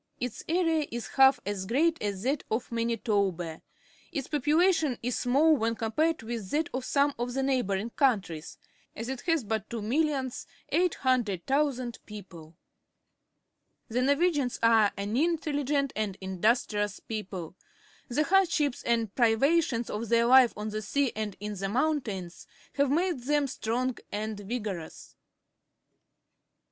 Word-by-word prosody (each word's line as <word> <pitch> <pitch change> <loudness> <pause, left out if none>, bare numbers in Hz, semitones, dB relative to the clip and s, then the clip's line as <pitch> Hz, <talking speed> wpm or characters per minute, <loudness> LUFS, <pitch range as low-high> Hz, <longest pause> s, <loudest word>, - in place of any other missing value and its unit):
Its 250 -2 -4
area 325 -3 +2
is 235 -1 -4
about - - -14 0.2
half - - -20
as 195 -2 -3
great 320 +8 +2
as 200 -2 -3
that 275 +2 0
of 230 +3 -2
Manitoba. 205 -8 -1 0.5
Its 280 -6 -3
popula 305 +6 +3
tion 295 -8 -1
is 245 0 -1
small 290 +6 +4
when 230 -3 0
compared 300 +7 0
with 225 -4 -5
that 305 +6 0
of 255 0 -2
some 280 +2 +2
of 245 +1 -3
the 270 - 0
neighbouring 235 -5 0
countries, 200 - 0 0.4
as 230 +3 -5
it 265 -2 -4
has 330 -6 +1
but 220 0 -3
2,800,000 260 - -1
people. 175 -6 -11 1.3
The 240 +3 0
Norwegians 285 -1 +2
are 225 -3 +5
an 200 +2 -3
intelUgent 290 -2 0
and 210 -3 -2
in 190 -2 -6
dustrious 210 -3 +1
people. 190 -6 -5 0.5
The 280 +4 +1
hardships 335 -6 +2
and 230 -3 0
priva 260 +8 +4
tions 235 -4 -3
of 215 +1 -4
their 235 0 +4
life 255 0 +7
on 210 +1 -3
the 215 0 -3
sea 270 +5 0
and 215 -2 -4
in 210 +1 -4
the 195 0 -3
moun 295 +7 +1
tains 185 -7 -7 0.3
have 280 -1 +2
made 340 +1 +1
them 295 0 +2
strong 250 -1 -2 0.2
and 215 0 -3
vigorous. 205 -6 -6
240 Hz, 140 wpm, -28 LUFS, 210-285 Hz, 1.3 s, life